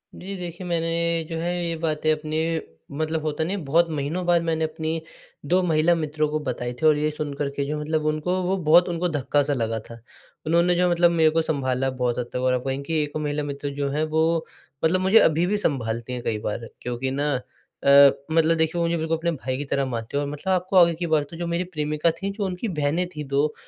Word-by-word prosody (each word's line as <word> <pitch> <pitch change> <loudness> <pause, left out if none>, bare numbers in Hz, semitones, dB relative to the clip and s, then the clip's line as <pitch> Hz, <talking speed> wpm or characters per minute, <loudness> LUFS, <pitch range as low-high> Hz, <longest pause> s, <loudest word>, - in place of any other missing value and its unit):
जी 195 +2 -6
देखिए, 180 0 -6
मैंने 170 0 0
जो 165 - -3
है 175 +2 -1
ये 165 0 -1
बातें 155 -1 0
अपनी 155 0 -2 0.6
मतलब 160 +1 -1
होता 155 +1 -1
नही 180 +5 -2
है 200 - -4
बहुत 165 +4 +2
महीनों 155 +4 -2
बाद 175 -1 +3
मैंने 160 -1 0
अपनी 160 +1 -3 0.4
2 180 +5 +3
महिला 165 0 +3
मित्रों 155 -1 -1
को 155 +1 -1
बताई 120 -1 -3
थी 125 +5 -3
और 155 -1 +5
ये 150 +1 +1
सुनकर 145 -2 -3
के 140 - -1
जो 150 +2 -3
मतलब 155 +1 -1
उनको 155 +3 0
वो 185 +2 +1
बहुत 175 +1 +5
उनको 175 +1 -1
धक्का-सा 145 -1 +1
लगा 115 -3 -1
था। 115 +1 -12 0.4
उन्होंने 170 +2 +3
जो 180 +1 +2
मतलब 175 0 +4
मेरे 160 -2 +4
को 165 +1 +2
सँभाला 135 -4 -1
बहुत 120 -1 +1
हद 125 - -2
तक - - -1
और 130 0 +2
आप 125 -1 -1
कहें 135 +1 -2
कि 155 +2 0
1 145 +1 -4
महिला 150 -1 -2
मित्र 145 0 -4
जो 140 -1 -1
हैं 150 +3 -1
वो 160 +1 +1 0.4
मतलब 185 +3 +2
मुझे 190 +4 +6
अभी 160 +2 +3
भी 205 +3 0
सँभालती 120 - -2
हैं 125 - -4
कई 110 -3 -1
बार 110 +2 -4
क्योंकि 125 +2 -3
ना 145 +2 0 0.5
अ, 140 0 +8 0.2
मतलब 165 0 +3
देखिए 160 +1 +1
वो - - +2
मुझे 170 - 0
बिल्कुल 160 0 -1
अपने 170 +1 -1
भाई 130 -4 -3
की 145 - -4
तरह 140 0 0
मानती 120 0 -4
हैं। 145 - +1
और 140 - -3
मतलब 150 +6 -3
आपको 185 +1 -1
आगे 170 -2 +7
की 170 +1 -3
बात 155 -2 +2
बताऊँ 165 +4 -11
जो 175 - -2
मेरी 170 +1 -1
प्रेमिका 150 +2 +1
थीं 195 +1 -2
जो 200 0 -3
उनकी 185 +4 -3
बहनें 155 +5 +1
थीं 150 0 -5
2 140 +2 +1
155 Hz, 235 wpm, -24 LUFS, 140-170 Hz, 0.6 s, अ